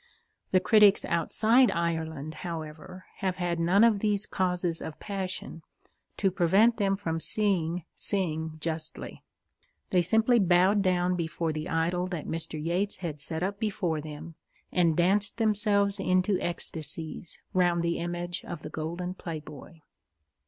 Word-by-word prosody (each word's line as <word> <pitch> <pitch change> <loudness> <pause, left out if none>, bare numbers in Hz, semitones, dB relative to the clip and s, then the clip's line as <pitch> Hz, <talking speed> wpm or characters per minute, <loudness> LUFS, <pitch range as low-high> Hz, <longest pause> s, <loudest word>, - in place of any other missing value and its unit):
The 185 - +4
critics 210 0 +5
outside 220 +9 +3
Ireland, 160 -3 -3
however, 170 +2 -7
have 185 -2 -1
had 175 -2 -2
none 180 +6 +4
of 225 -3 +4
these 210 0 0
causes 180 -3 -1
of 160 - -7
passion 190 -4 -5 0.6
to 195 -2 +1
prevent 195 +6 +3
them 195 -2 +1
from 165 -5 -3
seeing 180 -4 +1
Synge 160 -5 0
justly. 160 0 -5 0.7
They 180 - +4
simply 225 +7 +3
bowed 185 +2 +4
down 180 -1 +1
before 165 -1 -2
the 155 +2 -5
idol 175 +3 0
that 175 -4 -5
Mr. 160 -1 -1
Yeats 175 +6 -1
had 150 -3 -4
set 160 +4 -2
up 200 +1 -3
before 180 -7 -1
them, 155 +2 -9 0.4
and 170 -3 +2
danced 200 +5 +2
themselves 205 -2 +2
into 185 +1 +1
ecstasies 160 -1 -2
round 175 -2 +2
the 170 0 -1
image 175 +1 -4
of 170 -4 -8
the - - -7
golden 170 +3 -4
playboy. 155 -2 -9
175 Hz, 140 wpm, -28 LUFS, 165-195 Hz, 0.7 s, critics